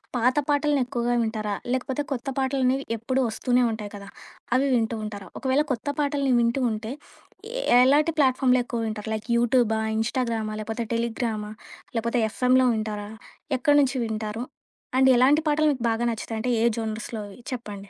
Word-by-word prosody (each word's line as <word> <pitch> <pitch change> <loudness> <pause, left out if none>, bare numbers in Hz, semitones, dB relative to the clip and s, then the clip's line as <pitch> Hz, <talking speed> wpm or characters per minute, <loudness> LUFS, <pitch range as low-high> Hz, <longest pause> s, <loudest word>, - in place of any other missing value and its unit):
పాత 250 +3 +2
పాటలను 290 -1 +2
ఎక్కువగా 245 -1 -1
వింటారా? 215 -2 -2 0.2
లేకపోతే 260 +2 -1
కొత్త 265 +1 -3
పాటలనేవి 265 0 +1
ఎప్పుడు 255 +4 -1
వస్తూనే 245 +2 +1
ఉంటాయి 210 -2 -6
కదా! 200 0 -9 0.5
అవి 275 +2 +3
వింటూ 225 -1 0
ఉంటారా? 205 -2 -7
ఒకవేళ 265 +3 +2
కొత్త 245 +2 -3
పాటల్ని 285 -2 +1
వింటూ 235 +3 +1
ఉంటే 220 +3 -4 0.9
ఎలాంటి 295 +5 +4
ప్లాట్‌ఫారమ్‌లో 255 -2 +3
ఎక్కువ 240 -1 -3
వింటారు? 215 0 -5
లైక్ 215 +2 -7
యూట్యూబా! 235 -2 +2 0.2
ఇన్‌స్టాగ్రామా! 225 -2 -1
లేకపోతే 225 +2 -3
టెలిగ్రామా! 225 -2 -2 0.4
లేకపోతే 235 +1 0
ఎఫ్ఎం‌లో 255 +3 +3
వింటారా? 210 -1 -4 0.5
ఎక్కడి 290 +4 +3
నుంచి 270 -1 0
వింటారు? 220 +1 -3 0.5
అండ్ 265 0 +5
ఎలాంటి 280 +5 +5
పాటలు 305 +1 +3
మీకు 255 - -6
బాగా 225 +1 -1
నచ్చుతాయి 225 0 -4
అంటే 250 - 0
ఏ - - +4
జోనర్స్‌లో‌వీ 215 -1 -5
చెప్పండి. 205 -5 -7
240 Hz, 150 wpm, -25 LUFS, 220-260 Hz, 0.9 s, అండ్